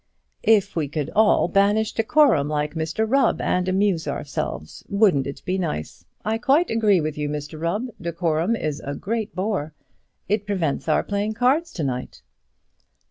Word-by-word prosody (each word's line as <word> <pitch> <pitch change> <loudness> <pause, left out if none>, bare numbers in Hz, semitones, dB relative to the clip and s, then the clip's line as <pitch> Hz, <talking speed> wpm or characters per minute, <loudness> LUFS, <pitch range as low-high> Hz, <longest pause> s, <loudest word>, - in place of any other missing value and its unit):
"If 210 -3 +3
we 160 -4 0
could 150 0 -3
all 215 0 +4
banish 210 +2 +2
decorum, 225 - +3
like 150 0 -1
Mr 160 +7 -1
Rubb, 275 +4 +2
and 180 0 0
amuse 190 -3 +1
ourselves, 135 - -4
wouldn't 200 -10 +3
it 140 - -7
be 185 +1 -1
nice? 150 - -4 0.2
I 220 +1 0
quite 285 +8 +3
agree 215 -4 +3
with 155 -1 -3
you, 150 0 -1
Mr 150 +1 -6
Rubb; 175 +9 -1 0.2
decorum 170 +3 0
is 155 -7 -3
a 140 +1 -4
great 220 +2 -3
bore; 185 -5 -2 0.5
it 210 +1 -1
prevents 175 -9 -1
our 155 - +3
playing 205 +1 -2
cards 275 +8 +2
to 165 - -3
night." 125 -2 -4
185 Hz, 160 wpm, -23 LUFS, 155-220 Hz, 0.5 s, all